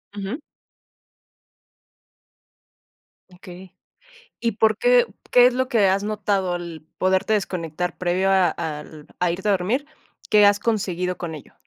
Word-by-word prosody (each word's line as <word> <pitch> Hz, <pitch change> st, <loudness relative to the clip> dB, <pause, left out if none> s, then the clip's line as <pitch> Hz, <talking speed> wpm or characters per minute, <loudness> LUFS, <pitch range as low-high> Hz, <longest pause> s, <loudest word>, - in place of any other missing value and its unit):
Ujú. 205 Hz, +8 st, -5 dB, 2.9 s
Okey, 180 Hz, 0 st, -13 dB, 0.6 s
¿y 230 Hz, -2 st, -1 dB
por 220 Hz, 0 st, +2 dB
qué -, -, +4 dB, 0.3 s
qué 245 Hz, 0 st, +7 dB
es 250 Hz, -, +4 dB
lo 260 Hz, 0 st, 0 dB
que 215 Hz, -6 st, +3 dB
has 195 Hz, +2 st, +1 dB
notado 200 Hz, -3 st, -1 dB
al 170 Hz, -2 st, -6 dB, 0.2 s
poderte 190 Hz, +3 st, +1 dB
desconectar, 180 Hz, -4 st, -3 dB
previo 185 Hz, +2 st, +1 dB
a 190 Hz, -2 st, +4 dB
al 155 Hz, -2 st, -7 dB
a 180 Hz, -1 st, +1 dB
irte 190 Hz, +4 st, -4 dB
a -, -, +4 dB
dormir? 205 Hz, +10 st, 0 dB, 0.5 s
¿Qué 210 Hz, -1 st, +6 dB
has 205 Hz, 0 st, +3 dB
conseguido 180 Hz, -5 st, -1 dB
con 165 Hz, -2 st, -5 dB
ello? 145 Hz, -, -13 dB
190 Hz, 135 wpm, -22 LUFS, 175-215 Hz, 2.9 s, qué